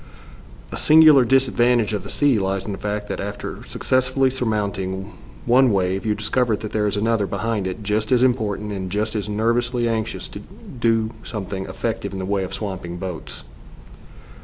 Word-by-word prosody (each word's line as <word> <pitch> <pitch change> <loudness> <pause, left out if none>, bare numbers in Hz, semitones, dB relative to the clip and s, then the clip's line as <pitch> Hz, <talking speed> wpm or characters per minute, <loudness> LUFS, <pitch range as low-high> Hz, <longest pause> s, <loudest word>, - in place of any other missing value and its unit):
A - - -4
singular 155 -3 +7
disadvantage 120 -3 +3
of 105 - -1
the - - -9
sea 140 -6 +3
lies 95 0 -1
in 105 - -4
the 100 - -5
fact 105 0 -3
that - - -4
after 100 +1 -5
successfully 130 +1 +1
surmounting 100 -5 -2 0.3
one 125 +1 +5
wave 95 +2 0
you 105 - +2
discover 125 -2 +1
that 105 +1 -7
there 105 -1 +1
is 100 - -1
another 110 -1 +1
behind 100 +1 -2
it 100 +4 -5
just 105 +2 -1
as 125 -1 +4
important 105 -5 0
and 95 -2 -4
just 105 +3 -1
as 105 -2 -3
nervously 120 +3 +1
anxious 110 -1 -2
to - - -8
do 115 -2 -2
something 95 -4 -5
effective - - -3
in - - -4
the 95 - -3
way 100 0 0
of 95 - -5
swamping 95 -4 -5
boats. 90 -3 -6
105 Hz, 175 wpm, -22 LUFS, 100-120 Hz, 0.3 s, singular